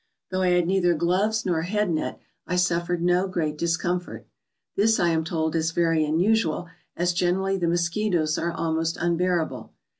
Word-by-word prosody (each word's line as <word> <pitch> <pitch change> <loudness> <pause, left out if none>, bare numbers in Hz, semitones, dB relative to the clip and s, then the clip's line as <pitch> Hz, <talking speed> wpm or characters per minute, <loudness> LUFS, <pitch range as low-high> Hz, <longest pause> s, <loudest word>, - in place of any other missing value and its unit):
Though 185 0 -1
I 185 - +3
had 180 -1 +3
neither 175 -1 +2
gloves 195 +7 +1
nor 170 -3 +1
head 205 +2 0
net 155 - -2 0.3
I 180 - -1
suffered 175 -1 0
no 180 +2 +2
great 160 -5 -2
discomfort. 175 +2 -2 0.5
This, 220 +2 +3
I 175 - +3
am 160 -1 +1
told, 160 0 -2
is 160 0 0
very 165 -2 +2
unusual, 175 +2 +1 0.3
as 175 +1 +1
generally 190 +2 +1
the 170 - 0
mosquitoes 170 -1 0
are 170 +1 -1
almost 165 0 -1
unbear 175 0 +1
able. - - -10
175 Hz, 170 wpm, -25 LUFS, 165-180 Hz, 0.5 s, I